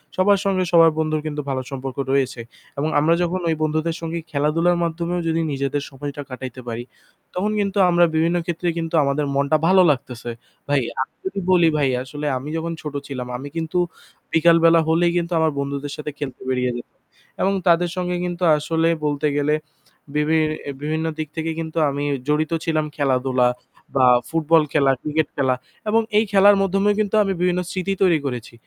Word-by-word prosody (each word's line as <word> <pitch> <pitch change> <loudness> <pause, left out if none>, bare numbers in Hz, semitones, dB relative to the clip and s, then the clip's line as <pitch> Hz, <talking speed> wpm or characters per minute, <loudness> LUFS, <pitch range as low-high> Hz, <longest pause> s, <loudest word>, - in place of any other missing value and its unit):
সবার 200 +1 +4
সঙ্গে 190 -2 +1
সবার 165 -1 +7
বন্ধুর 155 -1 0
কিন্তু 150 -1 -3
ভালো 130 -1 -1
সম্পর্ক 135 -1 -5
রয়েছে 135 -3 0 0.4
এবং 150 +3 0
আমরা 155 +3 +3
যখন 175 +2 -1
ওই 160 - +1
বন্ধুদের 155 +1 0
সঙ্গে 165 0 -3
খেলাধুলার 160 +4 +2
মাধ্যমেও 170 +1 -2
যদি 165 0 +1
নিজেদের 140 +1 -2
সময়টা 140 +1 -6
কাটাইতে 130 0 -7
পারি, 115 0 -4 0.5
তখন 200 +4 -1
কিন্তু 200 0 -1
আমরা 175 0 +5
বিভিন্ন 165 +2 +2
ক্ষেত্রে 175 +1 -2
কিন্তু 165 0 -2
আমাদের 140 +1 0
মনটা 140 +3 +2
ভালো 185 +1 +6
লাগতেছে। 125 -3 -5 0.4
ভাই, 145 -1 +3 0.2
আমি 130 - -4
যদি 190 +1 -3
বলি 175 -3 +5
ভাই 140 -3 +2
আসলে 145 +3 -7
আমি 135 +4 -7
যখন 165 +1 -3
ছোট 150 -2 -6
ছিলাম, 125 -3 -5
আমি 135 +3 -7
কিন্তু 160 +1 -2 0.6
বিকালবেলা 165 0 +5
হলেই 170 +1 +3
কিন্তু 170 0 -2
আমার 160 -1 +2
বন্ধুদের 140 0 -3
সাথে 150 0 -5
খেলতে 140 -3 -6
বেরিয়ে 125 -1 0
যেতাম। 120 - -11 0.4
এবং 195 - +2
তাদের 175 0 +4
সঙ্গে 180 0 -1
কিন্তু 175 0 -4
আসলেই 165 +2 +1
বলতে 145 0 0
গেলে 145 +1 +2 0.6
বিভিন 155 +1 +2 0.3
বিভিন্ন 155 +2 -2
দিক 155 -1 -3
থেকে 160 0 -1
কিন্তু 160 0 -5
আমি 140 +1 -3 0.2
জড়িত 150 +1 +1
ছিলাম 155 -2 +1
খেলাধুলা 130 -3 +2 0.5
বা 130 -1 +5 0.2
ফুটবল 165 0 +3
খেলা, 140 -3 +4
ক্রিকেট 155 0 0
খেলা 130 -2 +2 0.3
এবং 225 +2 +4 0.2
এই 215 - +4
খেলার 200 0 +6
মধ্যমেই 195 +2 +2
কিন্তু 210 0 -1
আমি 195 -1 -1
বিভিন্ন 180 0 +2
স্মৃতি 190 +1 -2
তৈরি 170 -4 +4
করেছি। 125 -4 -5
155 Hz, 175 wpm, -21 LUFS, 140-175 Hz, 0.6 s, সবার